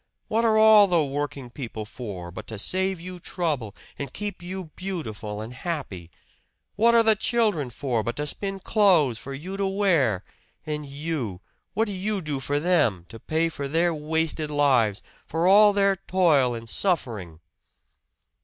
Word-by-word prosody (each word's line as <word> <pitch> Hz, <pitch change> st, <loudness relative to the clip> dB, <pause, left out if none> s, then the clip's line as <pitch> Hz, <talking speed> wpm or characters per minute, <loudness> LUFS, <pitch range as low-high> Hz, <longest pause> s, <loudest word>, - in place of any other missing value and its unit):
What 225 Hz, +2 st, +1 dB
are 220 Hz, -1 st, +4 dB
all 215 Hz, -2 st, +8 dB
the 170 Hz, -5 st, +2 dB
working 140 Hz, -2 st, -4 dB
people 115 Hz, -5 st, -6 dB
for 100 Hz, -7 st, -7 dB
but -, -, -9 dB
to 110 Hz, -, -6 dB
save 190 Hz, -, 0 dB
you 180 Hz, +1 st, -8 dB
trouble 150 Hz, -, -2 dB, 0.2 s
and 140 Hz, -2 st, -4 dB
keep 205 Hz, +1 st, -5 dB
you 180 Hz, -2 st, -6 dB
beautiful 110 Hz, -, -5 dB
and 115 Hz, +3 st, -7 dB
happy? 125 Hz, -, -5 dB, 0.7 s
What 235 Hz, +3 st, +4 dB
are 230 Hz, -, +6 dB
the 220 Hz, -1 st, +5 dB
children 210 Hz, -, +1 dB
for 120 Hz, -1 st, -2 dB
but 120 Hz, +2 st, -3 dB
to 150 Hz, -, -2 dB
spin 195 Hz, +5 st, -4 dB
clothes 175 Hz, -, +3 dB
for 135 Hz, 0 st, -7 dB
you 185 Hz, +8 st, -6 dB
to 195 Hz, -1 st, 0 dB
wear? 170 Hz, -, +2 dB, 0.4 s
And 150 Hz, -1 st, -4 dB
you 140 Hz, -, -4 dB, 0.3 s
what 220 Hz, +3 st, +2 dB
do 205 Hz, -, -4 dB
you 200 Hz, +2 st, -2 dB
do 150 Hz, -5 st, -3 dB
for 145 Hz, +2 st, -1 dB
them, 145 Hz, -, +2 dB
to 115 Hz, -, -10 dB
pay 160 Hz, +6 st, 0 dB
for 145 Hz, -4 st, -4 dB
their 165 Hz, +4 st, +1 dB
wasted 155 Hz, 0 st, -1 dB
lives, 130 Hz, -8 st, +2 dB, 0.2 s
for 165 Hz, +2 st, -1 dB
all 205 Hz, +3 st, +7 dB
their 200 Hz, -1 st, +3 dB
toil 165 Hz, -10 st, +2 dB
and 115 Hz, 0 st, -8 dB
suffering?" 110 Hz, -, -2 dB
155 Hz, 165 wpm, -25 LUFS, 125-190 Hz, 0.7 s, all